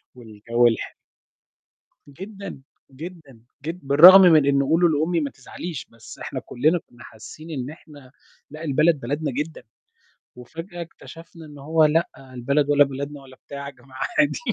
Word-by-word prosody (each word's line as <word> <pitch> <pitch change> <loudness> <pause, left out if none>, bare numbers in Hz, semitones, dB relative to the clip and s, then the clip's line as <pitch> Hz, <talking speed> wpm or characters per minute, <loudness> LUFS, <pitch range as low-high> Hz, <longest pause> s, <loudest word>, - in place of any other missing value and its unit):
والجو 115 +1 0
الح 115 - -2 1.1
جدًا، 190 +2 -10 0.3
جدًا 150 -4 -11 0.3
جد 170 +3 -5
بالرغم 180 +7 +9
من 160 -5 +6
إن 140 0 +2
قولوا 165 +5 +3
لأمي 160 +3 0
ما 145 - -2
تزعليش، 150 +4 -8
بس 115 -1 -14
إحنا - - -5
كلنا 155 +8 0
كنا 120 0 -16
حاسين 155 +9 -12
إن 130 -2 -5
إحنا 145 -4 -15 0.4
لأ 155 +2 -9
البلد 155 +1 +2
بلدنا 145 +4 -3
جدًا 150 +2 -5 0.7
وفجأة 165 +8 -9
اكتشفنا 165 0 -13
إن 145 -1 -13
هو 155 +3 +2
لأ 160 +2 +2
البلد 135 +2 -2
ولا 145 0 +6
بلدنا 140 +1 -7
ولا 130 -1 -16
بتاع 140 0 -7
يا 140 - -7
جماعة 130 0 -12 0.2
عادي. 305 -1 +2
145 Hz, 150 wpm, -23 LUFS, 130-165 Hz, 1.1 s, بالرغم